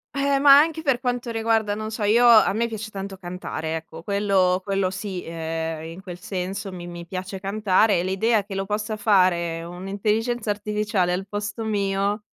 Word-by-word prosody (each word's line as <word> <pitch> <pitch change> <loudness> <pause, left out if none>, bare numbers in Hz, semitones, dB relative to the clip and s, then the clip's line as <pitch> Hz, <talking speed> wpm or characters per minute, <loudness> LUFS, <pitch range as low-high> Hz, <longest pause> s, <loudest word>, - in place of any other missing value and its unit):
Eh, 275 0 +2
ma 280 0 +8
anche 320 +1 +1
per 270 -5 +2
quanto 245 -1 -2
riguarda, 225 -2 +1
non 215 +1 -4
so, 220 0 -4
io 230 +4 +5
a 225 -4 +7
me 230 +3 0
piace 220 -1 -6
tanto 195 -1 -6
cantare, 175 -3 -5
ecco, 160 0 -10
quello 195 -2 +2
quello 195 -1 0
sì. 190 -1 -5
Ehm, 160 -1 -4
in 165 +3 -9
quel 180 -2 -8
senso 190 +2 -4
mi 175 -2 -8
mi 175 0 -8
piace 190 +2 -5
cantare, 200 0 +2
e 170 - 0
l'idea 205 +4 +1
che 200 - -8
lo 195 0 -3
possa 210 +1 -2
fare 180 -5 +2
un'intelligenza 210 +6 -2
artificiale 205 -3 -1
al 190 +2 -2
posto 205 +2 -4
mio, 200 0 -1
200 Hz, 180 wpm, -24 LUFS, 185-220 Hz, -, ma